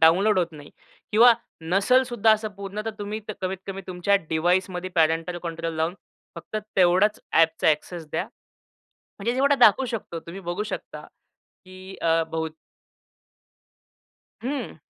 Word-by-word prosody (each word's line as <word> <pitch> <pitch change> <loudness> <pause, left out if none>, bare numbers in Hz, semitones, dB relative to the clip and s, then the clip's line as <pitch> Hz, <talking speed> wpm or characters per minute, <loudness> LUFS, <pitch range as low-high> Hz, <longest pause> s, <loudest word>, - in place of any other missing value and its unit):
Download 185 +5 +5
होत 170 -2 0
नाही 145 -2 -12 0.4
किंवा 235 +3 +8 0.3
नसेल 195 +10 +3
सुद्धा 235 -3 +2
असं 215 0 0
पूर्ण 200 +1 -5 0.2
तुम्ही 210 +1 -4 0.2
कमीत 185 0 -2
कमी 195 0 -5
तुमच्या 185 +2 +1
डिव्हाइसमध्ये 180 +2 0
पॅरेंटल 165 +2 +1
कंट्रोल 165 -1 -4
लावून 160 +3 0 0.4
फक्त 215 - -6 0.2
तेवढाच 185 +3 +4
ॲपचा 160 -1 +3
ॲक्सेस 160 +2 -1
द्या. - - -1 1.0
म्हणजे 230 +4 -1
जेवढा 280 +2 +3
दाखवू 245 0 +5
शकतो. 215 -8 -5
तुम्ही 170 +4 -9
बघू 175 +3 -3
शकता, 215 - -6 0.6
की 185 +1 -11
अ, 165 0 +3
बहू 160 0 -1 2.0
हं. 260 - -4
185 Hz, 130 wpm, -25 LUFS, 165-210 Hz, 2.0 s, किंवा